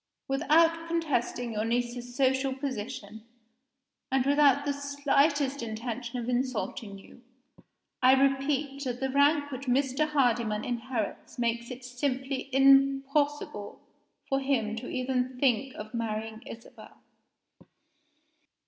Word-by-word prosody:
Without 325 Hz, +4 st, +3 dB
contesting 290 Hz, -7 st, -1 dB
your 215 Hz, 0 st, -1 dB
niece's 240 Hz, +1 st, -2 dB
social 265 Hz, 0 st, +1 dB
position 230 Hz, -5 st, -5 dB, 0.9 s
and 265 Hz, -1 st, +2 dB
without 285 Hz, 0 st, +4 dB
the 285 Hz, -, 0 dB
slightest 280 Hz, 0 st, +1 dB
intention 235 Hz, +2 st, -5 dB
of 240 Hz, -1 st, -4 dB
insulting 245 Hz, -4 st, -2 dB
you 195 Hz, +5 st, -16 dB, 0.8 s
I 255 Hz, 0 st, +7 dB
repeat 275 Hz, +1 st, +1 dB
that 250 Hz, -1 st, -3 dB
the 265 Hz, 0 st, -1 dB
rank 285 Hz, +1 st, +3 dB
which 270 Hz, +1 st, -6 dB
Mr. 270 Hz, +3 st, +1 dB
Hardyman 235 Hz, -7 st, +1 dB
inherits 240 Hz, -2 st, -4 dB
makes 235 Hz, 0 st, -1 dB
it 250 Hz, 0 st, -8 dB
simply 265 Hz, +1 st, -3 dB
impossible 275 Hz, -3 st, +2 dB, 0.5 s
for 270 Hz, -, +1 dB
him 250 Hz, -6 st, 0 dB
even 255 Hz, 0 st, -1 dB
to -, -, -14 dB
think 265 Hz, 0 st, +1 dB
of 215 Hz, +2 st, -8 dB
marrying 220 Hz, -1 st, -3 dB
Isabel. 230 Hz, -, -12 dB
260 Hz, 110 wpm, -29 LUFS, 240-280 Hz, 0.9 s, I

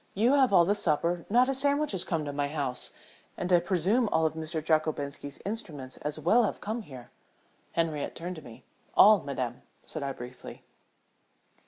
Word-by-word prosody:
You 230 Hz, +7 st, +3 dB
have 270 Hz, -4 st, +4 dB
all 175 Hz, -3 st, +6 dB
the 200 Hz, -, +3 dB
supper 170 Hz, -2 st, 0 dB
not 245 Hz, +4 st, +4 dB
a 270 Hz, -, +1 dB
sandwich 285 Hz, +2 st, +2 dB
has 190 Hz, -3 st, +1 dB
come 160 Hz, -4 st, -2 dB
to 145 Hz, -, -4 dB
my 145 Hz, 0 st, -1 dB
house 140 Hz, -4 st, -2 dB, 0.5 s
and 180 Hz, 0 st, -1 dB
I 175 Hz, -, +7 dB
presume 190 Hz, +7 st, +1 dB
all 160 Hz, 0 st, +2 dB
of 160 Hz, -, +1 dB
Mr. 160 Hz, 0 st, -3 dB
Jockobinski's 150 Hz, -3 st, -1 dB
instruments 165 Hz, -, -5 dB
as 150 Hz, +1 st, -3 dB
well 200 Hz, +10 st, +4 dB
have -, -, -3 dB
come 220 Hz, +3 st, -3 dB
here." 130 Hz, -, -12 dB, 0.6 s
Henriette 160 Hz, -3 st, -1 dB
turned 175 Hz, +1 st, -5 dB
to -, -, -8 dB
me. 115 Hz, -5 st, -13 dB, 0.3 s
"All, 210 Hz, -2 st, +7 dB
madame," 125 Hz, -4 st, -4 dB, 0.2 s
said 155 Hz, -, -5 dB
I, 140 Hz, -1 st, -2 dB
briefly. 125 Hz, 0 st, -10 dB
165 Hz, 180 wpm, -29 LUFS, 145-205 Hz, 0.6 s, I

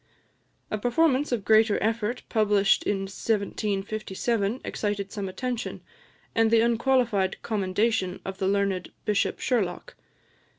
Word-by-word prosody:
A 215 Hz, -, -1 dB
performance 275 Hz, +4 st, +2 dB
of 225 Hz, -6 st, -1 dB
greater 220 Hz, -1 st, +5 dB
effort, 225 Hz, +2 st, -1 dB
published 205 Hz, -3 st, +3 dB
in 200 Hz, -1 st, 0 dB
1757, 205 Hz, +2 st, -2 dB
excited 205 Hz, -2 st, -3 dB
some 200 Hz, -3 st, -4 dB
attention, 245 Hz, +5 st, -4 dB, 0.5 s
and 225 Hz, -1 st, +3 dB
the 225 Hz, 0 st, +5 dB
unqualified 235 Hz, -4 st, +2 dB
commendation 200 Hz, -2 st, 0 dB
of 190 Hz, 0 st, -6 dB
the 190 Hz, -, 0 dB
learned 195 Hz, -2 st, 0 dB
Bishop 210 Hz, -2 st, +1 dB
Sherlock. 240 Hz, -, -1 dB
210 Hz, 115 wpm, -26 LUFS, 195-230 Hz, 0.5 s, greater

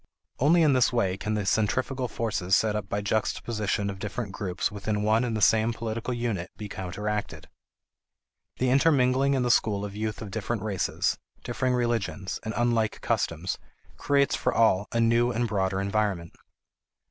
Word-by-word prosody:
Only 165 Hz, +5 st, +5 dB
in 150 Hz, -3 st, +5 dB
this 130 Hz, -1 st, +3 dB
way 100 Hz, -7 st, +1 dB
can 105 Hz, +2 st, -3 dB
the 105 Hz, -2 st, -1 dB
centrifugal 125 Hz, +6 st, 0 dB
forces 105 Hz, -5 st, 0 dB
set 110 Hz, -1 st, +2 dB
up 105 Hz, -, -4 dB
by 100 Hz, -, -1 dB
juxtaposition 105 Hz, 0 st, -1 dB
of 100 Hz, -1 st, -5 dB
different 105 Hz, +1 st, -4 dB
groups 95 Hz, 0 st, -2 dB
within 105 Hz, 0 st, -2 dB
one 110 Hz, +3 st, +3 dB
and 115 Hz, -3 st, -1 dB
the 110 Hz, -, 0 dB
same 110 Hz, +1 st, +4 dB
political 115 Hz, +2 st, -4 dB
unit 115 Hz, -7 st, -2 dB
be 105 Hz, -, -6 dB
counteracted. 105 Hz, +2 st, -4 dB, 1.1 s
The 125 Hz, 0 st, +1 dB
intermingling 135 Hz, -1 st, +3 dB
in 130 Hz, -, +1 dB
the 120 Hz, -, +2 dB
school 105 Hz, -3 st, +2 dB
of 100 Hz, -1 st, -7 dB
youth 110 Hz, -1 st, -3 dB
of 100 Hz, -, -8 dB
different 110 Hz, 0 st, -3 dB
races, 100 Hz, -4 st, -1 dB, 0.2 s
differing 125 Hz, +1 st, 0 dB
religions, 120 Hz, -5 st, -1 dB
and 110 Hz, -, -5 dB
unlike 115 Hz, -3 st, +1 dB
customs 85 Hz, +3 st, -1 dB, 0.4 s
creates 140 Hz, -1 st, +2 dB
for -, -, 0 dB
all 105 Hz, -3 st, +3 dB
a 115 Hz, -, 0 dB
new 115 Hz, +1 st, +3 dB
and 120 Hz, 0 st, 0 dB
broader 95 Hz, -3 st, 0 dB
environment. 100 Hz, -4 st, -1 dB
110 Hz, 165 wpm, -27 LUFS, 100-120 Hz, 1.1 s, Only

